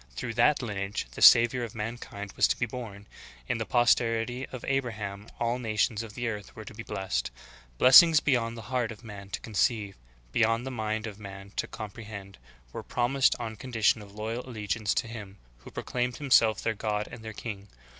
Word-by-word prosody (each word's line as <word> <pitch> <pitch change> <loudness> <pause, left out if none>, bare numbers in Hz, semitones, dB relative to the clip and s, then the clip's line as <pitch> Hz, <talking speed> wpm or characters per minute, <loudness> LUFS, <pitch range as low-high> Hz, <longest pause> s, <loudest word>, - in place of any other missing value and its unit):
Through 120 -2 -4
that 125 +4 +3
lineage 100 -3 -3
the - - -9
Savior 120 +1 +7
of 115 -2 -6
mankind 105 -2 -6
was - - +4
to - - 0
be 120 - 0
born; 110 -4 -8 0.4
in - - -1
the 110 - -3
posterity 120 +1 +2
of 130 - -8
Abraham 110 -6 -2
all 120 +1 0
nations 110 -1 0
of 110 -3 -9
the 120 -1 -2
earth 105 -3 -5
were 110 - -9
to - - -9
be 110 - -7
blessed. 65 - -2 0.5
Blessings 155 - +9
beyond 120 -6 0
the 115 - -8
heart 120 -2 0
of 110 +1 -11
man 100 -3 -9
to - - -3
conceive, 110 -2 0 0.4
beyond 115 - +2
the 135 - -4
mind 110 -2 -2
of 105 -2 -7
man 100 -1 -9
to - - -1
compre 110 +1 -8
hend, 100 -2 -9 0.3
were - - -5
promised 125 +2 +2
on 115 -2 -4
condition 115 -3 +1
of 100 0 -13
loyal 110 +3 -4
allegiance 105 -3 -1
to 125 - 0
Him 105 -4 -9 0.2
who - - -12
proclaimed 125 0 -3
Himself 115 -7 +4
their 110 - +1
God 105 0 -2
and 115 - -10
their 110 - -6
King. 100 -2 -7
110 Hz, 195 wpm, -28 LUFS, 105-120 Hz, 0.5 s, Blessings